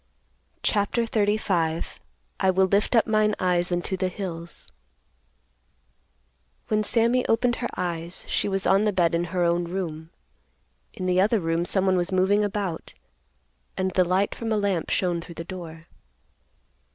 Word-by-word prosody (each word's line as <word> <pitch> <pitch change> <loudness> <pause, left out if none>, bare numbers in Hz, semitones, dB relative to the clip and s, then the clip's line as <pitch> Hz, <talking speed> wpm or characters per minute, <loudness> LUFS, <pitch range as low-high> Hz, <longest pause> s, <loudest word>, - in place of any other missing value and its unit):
CHAPTER 210 +3 +1
XXXV. 205 -7 0 0.4
"I 190 - +3
WILL 190 +1 +4
LIFT 205 +4 +2
UP 225 - +5
MINE 215 -1 +2
EYES 180 -1 +1
UNTO 175 +2 -1
THE 185 - 0
HILLS." 170 -3 -6 2.0
When 215 0 +2
Sammy 235 +3 +3
opened 240 +2 +2
her 240 - -3
eyes, 170 -1 -3
she - - 0
was 195 0 -1
on 195 +3 +4
the 210 - +1
bed 170 -3 +2
in 170 +1 +1
her 180 +1 -1
own 170 0 +1
room. 165 -3 -5 0.9
In 185 - -4
the 185 0 +3
other 215 +3 +3
room 165 0 0
someone 190 0 +2
was 175 +2 0
moving 190 +3 +3
about, 200 -5 -3 0.8
and 185 0 0
the 185 0 +3
light 185 +3 +1
from 225 -1 -4
a 215 - +2
lamp 200 -5 0
shone 175 -2 0
through 170 0 -11
the 165 - -5
door. 165 -3 -8
185 Hz, 150 wpm, -25 LUFS, 175-205 Hz, 2.0 s, UP